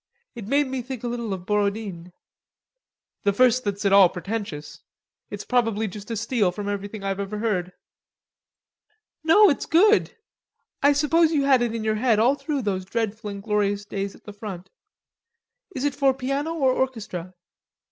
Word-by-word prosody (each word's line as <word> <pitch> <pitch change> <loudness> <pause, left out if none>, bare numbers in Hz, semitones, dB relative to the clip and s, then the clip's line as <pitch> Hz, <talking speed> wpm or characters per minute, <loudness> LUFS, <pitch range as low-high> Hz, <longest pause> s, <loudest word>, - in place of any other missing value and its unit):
It 230 -5 -8
made 285 +4 +2
me 260 -1 -3
think 255 -1 -7
a - - -2
little 235 -2 -3
of 185 -2 -5
Borodine." 200 -4 -2 1.1
"The 200 - +2
first 255 +3 +3
that's 200 0 -3
at 200 - +3
all 195 -3 +8
pretentious. 175 -6 -6 0.5
It's 205 - -7
probably 225 -3 +1
just 205 +2 -9
a 230 - -3
steal 215 -3 +1
from 205 +2 -6
everything 205 +1 -4
I've 195 0 -2
ever 200 +1 -4
heard." 195 -5 -1 1.5
"No, 410 +7 +6
it's 280 - -3
good. 415 +9 +4 0.6
I 285 - +5
suppose 315 +3 +3
you 290 -3 +2
had 270 -3 +4
it 235 -1 -1
in 225 - -3
your 215 0 0
head 240 -4 +3
all 235 +5 +4
through 285 -2 -3
those 190 -3 -1
dreadful 215 +2 -3
and 200 -1 -7
glorious 205 -1 0
days 200 -1 -4
at - - -20
the 210 - -10
front.... 200 -4 -8 1.0
Is 260 - -3
it 290 - +1
for 270 -1 +2
piano 275 +5 -2
or 270 -5 +2
orchestra?" 205 -9 -3
215 Hz, 170 wpm, -24 LUFS, 200-260 Hz, 1.5 s, all